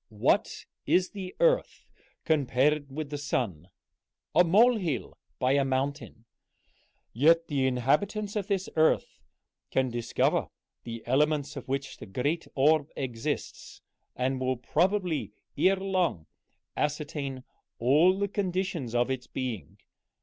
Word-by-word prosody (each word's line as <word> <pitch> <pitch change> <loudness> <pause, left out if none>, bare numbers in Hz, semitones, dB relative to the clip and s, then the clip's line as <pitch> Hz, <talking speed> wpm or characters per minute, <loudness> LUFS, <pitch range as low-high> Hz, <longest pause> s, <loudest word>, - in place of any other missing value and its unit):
What 105 -2 0 0.2
is 185 0 +3
the 190 -3 -7
earth - - +2 0.4
compared 145 -1 +2
with 150 +1 -5
the 145 - -3
sun? 95 - -2 0.6
a 175 - +6
molehill 190 - +2 0.2
by 130 0 +1
a 140 0 +3
mountain; 135 -3 -3 0.9
yet 165 +7 +4
the 135 -3 +1
inhabitants 150 - 0
of 205 -2 -2
this 195 -2 -1
earth 160 0 +2 0.5
can 130 -1 +1
discover 120 -1 0 0.4
the 115 -1 -6
elements 145 +3 +1
of 135 - -7
which 135 +1 -3
the - - -10
great 145 - -2
orb 150 +2 +3
consists, 120 -4 -5 0.3
and 130 +1 -1
will 130 0 0
probably 160 - 0 0.2
ere 195 +1 +4
long 185 - -1 0.5
ascertain 145 -3 -3 0.3
all 155 +10 +4
the 200 0 0
conditions 185 - -2
of 120 +2 +2
its 130 -1 -4
being. 105 - -5
145 Hz, 120 wpm, -28 LUFS, 130-180 Hz, 0.9 s, a